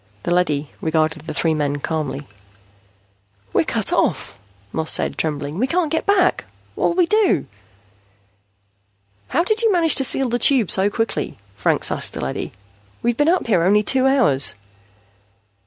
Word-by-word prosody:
The 175 - 0
leady 155 -5 0
regarded 160 -1 -1
the - - -4
three 160 +2 +1
men 145 -2 -1
calmly. 150 -1 -4 1.3
"We're - - +2
cut - - 0
off," - - 0 0.4
Moss 160 0 0
said, - - +1
trembling. 150 +1 -3
"We 255 - +1
can't 335 +1 0
get 320 - -2
back. 380 -3 +2 0.3
What'll 340 - 0
we 360 -1 +3
do?" 400 - +2 1.8
"How - - +1
did 435 +4 0
you 450 -2 +3
manage 335 -4 +4
to 270 - +2
seal 270 0 +1
the 240 +1 -1
Tube 245 -5 +4
so 195 +1 +2
quickly?" 225 +2 -3 0.2
Franks - - 0
asked - - -1
the - - -6
leady. 65 - -4 0.5
"We've 240 0 +1
been 295 +5 +2
up 360 +2 +1
here 200 -7 +2
only 205 +5 +3
two 265 +3 +2
hours." 235 - +3
210 Hz, 155 wpm, -20 LUFS, -, 1.8 s, manage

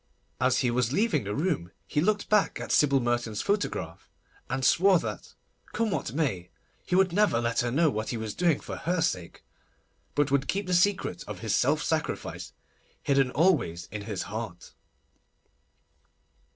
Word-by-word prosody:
As 130 0 +2
he 120 - +2
was 125 0 +1
leaving 200 - +1
the 100 +1 -3
room 150 - -1 0.2
he 150 - 0
looked 205 +3 +1
back 210 -2 +2
at - - -5
Sybil 140 -2 +4
Merton's 120 -3 -1
photograph, 200 - -2 0.4
and 130 +1 -1
swore 190 +6 +5
that, - - -6 0.4
come 225 -2 0
what 190 - -2
may, 115 - -2 0.3
he - - -1
would 185 -2 +3
never 205 - +3
let 115 0 0
her 120 - +1
know 155 +5 +3
what 110 -1 -3
he 120 - -2
was 110 -2 -4
doing 175 -4 +2
for - - -7
her 180 +1 -1
sake, 90 - -2 0.7
but 145 -1 +1
would 140 0 +2
keep 200 +1 -1
the 180 - -2
secret 185 +2 +1
of - - -7
his - - -1
self - - +2
sacrifice - - -3 0.5
hidden 135 -2 +3
always 135 - +1
in 105 0 -5
his 105 -4 -3
heart. 105 -4 -7
135 Hz, 165 wpm, -28 LUFS, 110-180 Hz, 0.7 s, swore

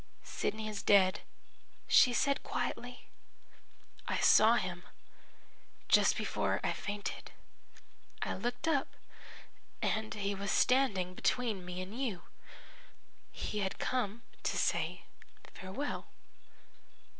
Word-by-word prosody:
"'Sidney 215 0 -3
is 210 -1 -4
dead,' 190 -2 +5 0.7
she 250 - +6
said 280 +3 +1
quietly. 245 +1 -4 1.0
'I - - 0
saw 220 +2 +6
him 185 -5 -2 1.1
just - - +5
before - - 0
I - - +1
fainted. 205 0 -5 0.9
I - - -2
looked 245 +4 -3
up, 285 -4 0 0.8
and 220 0 -1
he 200 -1 -1
was 200 0 -4
standing 205 -10 +2
between 220 -1 0
me 180 +1 -5
and 195 +4 -9
you. 205 -10 -2 1.1
He 210 - -4
had 190 -2 -2
come 235 -3 -2 0.2
to - - -1
say - - 0 0.5
farewell.' 195 +10 -5
210 Hz, 105 wpm, -33 LUFS, 190-245 Hz, 1.1 s, she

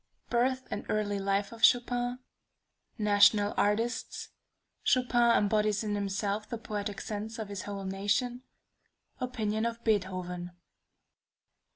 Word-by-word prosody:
Birth 260 +2 +1
and 205 - -3
Early 205 -1 0
Life 200 +1 0
of 230 0 -11
Chopin 245 0 +3 0.8
National 205 -1 +4
Artists 225 +4 0 0.5
Chopin 240 -2 +3
embodies 210 0 +2
in 210 -1 -2
himself 205 +1 -2
the 235 - -3
poetic 210 -2 -4
sense 215 +2 -5
of 220 -2 -5
his 200 -2 -4
whole 200 -1 -5
nation 205 +6 -1 0.8
Opinion 220 -4 -1
of 235 0 -3
Beethoven. 185 -4 -1
210 Hz, 110 wpm, -30 LUFS, 200-235 Hz, 0.8 s, National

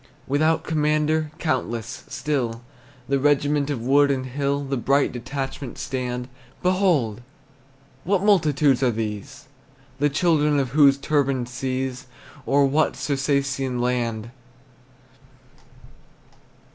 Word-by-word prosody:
Without 155 +4 +1
commander, 155 0 +1
countless, 125 -8 -3
still, 120 -6 -2 0.4
The 140 0 +1
regiment 145 0 +2
of 130 -6 -3
wood 140 +3 +4
and 130 -2 -1
hill 140 +2 -2
In 135 - 0
bright 140 +3 +2
detachment 135 +1 -5
stand. 125 -1 -3 0.4
Behold! 175 - +1 0.8
Whose 195 +2 +2
multitudes 155 -10 +3
are 130 - +3
these? 110 +3 -5 0.5
The 145 +1 +3
children 150 -1 +2
of 135 -2 0
whose 140 0 +5
turbaned 140 -4 0
seas, 130 0 -3 0.4
Or 140 +1 +4
what 145 +3 +1
Circassian 135 -2 -1
land? 120 -2 -1
140 Hz, 105 wpm, -23 LUFS, 125-150 Hz, 0.8 s, whose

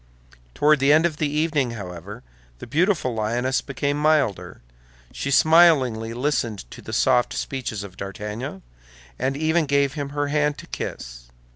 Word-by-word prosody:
Toward 150 0 +4
the 135 +2 +4
end 155 +2 +5
of 160 -3 -1
the 150 -2 0
evening, 150 -4 0
however, 90 -4 -8 0.3
the - - -9
beautiful 160 - +1
lioness 120 +4 0
became 140 +1 -2
milder; 110 - +1 0.5
she 140 - -4
smilingly 140 -8 +4
listened 120 - -1
to - - -10
the - - -9
soft 120 -1 +2
speeches 120 -6 -4
of 95 -2 -11
D'Artagnan, 105 +3 -6 0.6
and 135 +1 -1
even 160 +1 +1
gave 140 -1 +2
him 145 -2 -4
her 145 0 -2
hand 150 0 +1
to - - -10
kiss. - - -7
135 Hz, 150 wpm, -23 LUFS, 110-150 Hz, 0.6 s, end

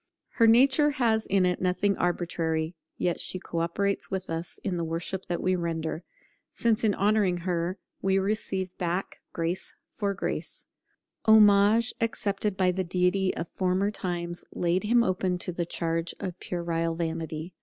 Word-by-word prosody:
Her 230 - +7
nature 265 +6 +5
has 220 -3 +2
in 190 -1 +3
it 180 -1 0
nothing 185 +2 +1
arbitrary, 165 -2 -1 0.2
yet 175 -2 0
she - - 0
co 170 -2 -4
operates 195 +4 -1
with 190 -3 -4
us 165 +1 -4
in 185 -3 -1
the 170 - -1
worship 165 +3 -3
that 175 - -2
we 185 0 +2
render, 165 -1 -3 0.5
since 230 -1 +1
in 210 -2 +3
honouring 200 -4 +2
her 175 +1 -1 0.2
we 195 0 +2
receive 195 -2 -1
back 180 +2 -2
'grace 170 +2 -3 0.2
for 200 -2 -1
grace'. - - -4 0.6
Homage 215 +1 +6
accepted 205 -3 -1
by 185 -1 +3
the 185 +1 -1
Deity 180 +2 +1
of 165 - -3
former 190 +2 0
times 175 -3 -4
laid 180 +3 0
him 235 +2 +4
open 185 -2 0
to 180 - -3
the 170 -1 -3
charge 165 0 -1
of 185 -2 -5
puerile 165 -1 -2
vanity. 165 0 -4
185 Hz, 155 wpm, -27 LUFS, 170-200 Hz, 0.6 s, Her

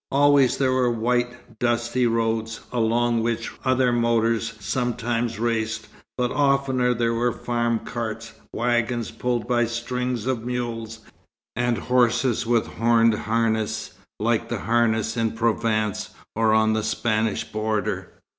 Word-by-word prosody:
Always 140 -2 +4
there 135 -2 +2
were 130 -1 +2
white, 120 0 -2
dusty 120 +1 +1
roads, 115 -1 -1
along 120 0 +1
which 115 0 -2
other 130 -1 +2
motors 115 -1 +1
sometimes 115 +2 -1
raced, 115 -1 -1 0.3
but 125 -1 0
oftener 135 -3 +2
there 115 0 +1
were 120 +1 +1
farm 120 0 -1
carts, 115 -1 -5 0.2
wagons 120 0 0
pulled 120 -2 -2
by 120 -1 +2
strings 120 0 -3
of 130 -3 -1
mules, 115 -2 -4 0.5
and 120 0 +1
horses 125 0 +1
with 115 -1 +2
horned 115 0 +3
harness 110 0 -1 0.3
like - - 0
the - - -3
harness 110 -1 +1
in 115 -1 0
Provence 110 -2 0 0.3
or 110 0 +3
on 110 0 +4
the 110 - +1
Spanish 110 0 0
border. 110 0 -2
115 Hz, 125 wpm, -24 LUFS, 110-120 Hz, 0.5 s, Always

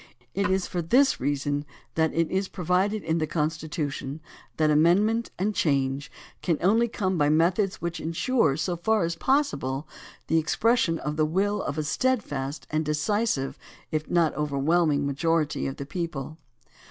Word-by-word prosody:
It 200 0 0
is 190 0 +1
for 175 - -3
this 260 - +3
reason 145 +1 -1 0.3
that 160 -1 +2
it 165 0 +1
is 190 +1 0
pro 180 -3 -7
vided 195 +4 +1
in 160 +1 0
the 155 - 0
Constitution 150 -2 -3 0.4
that 155 -1 +3
amendment 200 +10 +3
and 205 +4 0
change 140 -5 0 0.3
can 165 -3 +1
only 225 +6 +3
come 190 -6 -1
by 145 0 +3
methods 180 +6 +2
which 170 -1 -2
insure, 165 - +1
so 170 +3 -1
far 215 +3 +1
as 170 0 -1
pos 275 - +2
sible, 135 +1 -4 0.4
the 165 - +2
expression 195 +2 +2
of 150 -1 -4
the 155 - +3
will 200 +5 0
of 145 - -4
a 155 - 0
steadfast 150 - -1
and 155 +1 +1
de 150 0 -1
cisive 150 -3 0 0.3
if 155 0 -2
not 170 -3 +3
overwhelming 150 +1 +1
majority 155 +2 0
of 135 - -5
the 140 - -5
people. 155 -2 -5
165 Hz, 165 wpm, -26 LUFS, 150-190 Hz, 0.4 s, this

